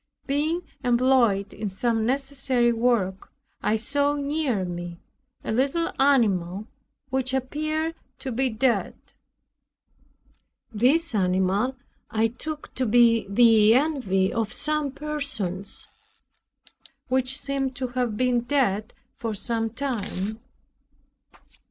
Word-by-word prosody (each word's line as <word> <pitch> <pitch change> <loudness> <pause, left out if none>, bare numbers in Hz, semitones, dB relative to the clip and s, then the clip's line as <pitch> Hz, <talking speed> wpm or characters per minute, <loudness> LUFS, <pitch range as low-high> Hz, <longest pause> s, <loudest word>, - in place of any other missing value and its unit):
Being 310 +5 0 0.2
employed 240 -5 +3
in 210 - -4
some 225 +3 0
necessary 265 -2 +1
work, 225 -5 0 0.3
I 215 - +1
saw 285 +6 +1
near 280 -8 -1
me 175 -1 -6 0.4
a - - -3
little 275 +8 +1
animal 205 -8 +2 0.5
which 260 0 0
appeared 310 +5 -2 0.2
to 265 - -5
be 260 +3 +1
dead. 240 +2 0 1.8
This 270 +8 +3
animal 190 +5 +1 0.3
I 225 +1 +1
took 300 +6 -7
to 255 -1 -1
be 230 -2 +4
the 220 0 +6
envy 250 -10 +1
of 225 -1 -1
some 305 +2 0
persons, 265 -10 -3 1.2
which 260 +1 +1
seemed 275 -2 -2
to 255 0 -3
have 245 -3 -1
been 250 0 +2
dead 235 -4 0 0.2
for 225 -2 -3
some 225 +1 -1
time. 220 -4 -3
245 Hz, 105 wpm, -25 LUFS, 215-275 Hz, 1.8 s, the